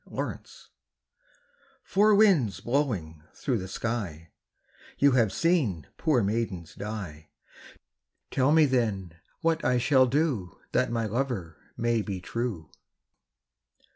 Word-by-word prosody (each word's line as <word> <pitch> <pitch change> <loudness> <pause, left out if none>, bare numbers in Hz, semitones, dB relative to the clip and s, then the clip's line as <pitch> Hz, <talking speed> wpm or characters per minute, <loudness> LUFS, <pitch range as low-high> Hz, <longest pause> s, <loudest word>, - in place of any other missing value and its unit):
Four - - -2
Winds - - -11 1.1
"Four 210 +2 +4
winds 185 - +4
blowing 105 - -1
through 125 -5 -1
the 95 - -6
sky, 95 -7 -4 0.7
You 140 0 +5
have 115 -6 +3
seen 120 - +1
poor 135 -8 +2
maidens 100 -5 -2
die, 95 -8 -7 1.0
Tell 135 +2 +2
me 160 0 +6
then 105 - -1 0.2
what 165 0 +1
I 125 - +2
shall 130 +1 +4
do 130 - -1
That 130 - +1
my 115 -1 -1
lover 110 - -3 0.2
may 120 -1 +1
be 100 -2 -4
true." 95 - -4
115 Hz, 115 wpm, -27 LUFS, 95-135 Hz, 1.1 s, me